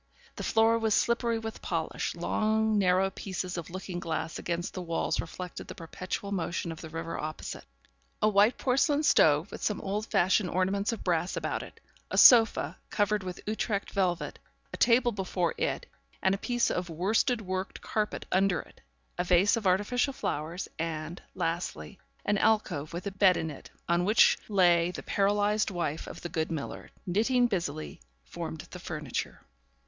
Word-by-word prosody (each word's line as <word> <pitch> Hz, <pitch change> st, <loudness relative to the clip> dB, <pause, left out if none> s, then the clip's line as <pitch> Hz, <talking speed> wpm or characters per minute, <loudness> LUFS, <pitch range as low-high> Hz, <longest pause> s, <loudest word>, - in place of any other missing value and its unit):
The -, -, -6 dB
floor 225 Hz, +1 st, +3 dB
was 220 Hz, -2 st, +2 dB
slippery 235 Hz, -1 st, +1 dB
with 225 Hz, 0 st, -6 dB
polish; -, -, -2 dB
long 220 Hz, 0 st, +1 dB
narrow 190 Hz, 0 st, +3 dB
pieces 185 Hz, -1 st, -4 dB
of 170 Hz, -3 st, -5 dB
looking 185 Hz, 0 st, -5 dB
glass 165 Hz, -1 st, -3 dB
against 175 Hz, +2 st, -3 dB
the 185 Hz, -, -4 dB
walls 165 Hz, -2 st, -1 dB
reflected 180 Hz, +2 st, -7 dB
the -, -, -8 dB
perpetual 185 Hz, +4 st, -5 dB
motion 175 Hz, -2 st, -2 dB
of 160 Hz, -, -8 dB
the 160 Hz, -, -8 dB
river 165 Hz, +1 st, -5 dB
opposite; 155 Hz, +1 st, -6 dB, 0.5 s
a 215 Hz, -, +3 dB
white 210 Hz, +3 st, +4 dB
porcelain 285 Hz, +3 st, +2 dB
stove, 155 Hz, -, +4 dB
with -, -, -8 dB
some 210 Hz, -, 0 dB
old 205 Hz, +3 st, -3 dB
fashioned 190 Hz, -1 st, +2 dB
ornaments 195 Hz, +3 st, 0 dB
of 230 Hz, -, -5 dB
brass 175 Hz, 0 st, 0 dB
about -, -, -2 dB
it; -, -, -11 dB, 0.3 s
a -, -, -3 dB
sofa, 230 Hz, -3 st, +6 dB
covered 210 Hz, 0 st, +1 dB
with 185 Hz, -1 st, -6 dB
Utrecht 210 Hz, -1 st, -2 dB
velvet, 185 Hz, -4 st, -1 dB, 0.3 s
a -, -, -4 dB
table 240 Hz, 0 st, +4 dB
before 185 Hz, -4 st, -1 dB
it, -, -, -1 dB, 0.3 s
and 190 Hz, -, +2 dB
a -, -, 0 dB
piece 240 Hz, +1 st, +1 dB
of 180 Hz, -1 st, -2 dB
worsted 210 Hz, -, +1 dB
worked 185 Hz, 0 st, -4 dB
carpet 210 Hz, -1 st, -2 dB
under 190 Hz, -2 st, +3 dB
it; -, -, -20 dB, 0.4 s
a -, -, +3 dB
vase 180 Hz, +3 st, +4 dB
of 220 Hz, -4 st, -1 dB
artificial 245 Hz, +9 st, +2 dB
flowers; 165 Hz, -, -3 dB
and, 160 Hz, +1 st, -4 dB
lastly, 165 Hz, -, -3 dB, 0.3 s
an 205 Hz, -1 st, +2 dB
alcove 190 Hz, -9 st, +1 dB
with 175 Hz, +3 st, -6 dB
a 200 Hz, -, -2 dB
bed 190 Hz, -1 st, +4 dB
in 160 Hz, -, -2 dB
it, 140 Hz, -, -11 dB, 0.2 s
on 170 Hz, +1 st, +2 dB
which 210 Hz, +5 st, +5 dB
lay 175 Hz, -4 st, +4 dB
the 180 Hz, -, -6 dB
paralysed 205 Hz, +2 st, +2 dB
wife 170 Hz, -5 st, -3 dB
of -, -, -8 dB
the 175 Hz, -, -5 dB
good 160 Hz, 0 st, -1 dB
miller, 155 Hz, -4 st, -5 dB, 0.2 s
knitting 230 Hz, +7 st, +2 dB
busily, 170 Hz, -8 st, -3 dB, 0.3 s
formed 160 Hz, -2 st, -6 dB
the 180 Hz, -, -8 dB
furniture. 150 Hz, -6 st, -4 dB
190 Hz, 170 wpm, -29 LUFS, 170-215 Hz, 0.5 s, sofa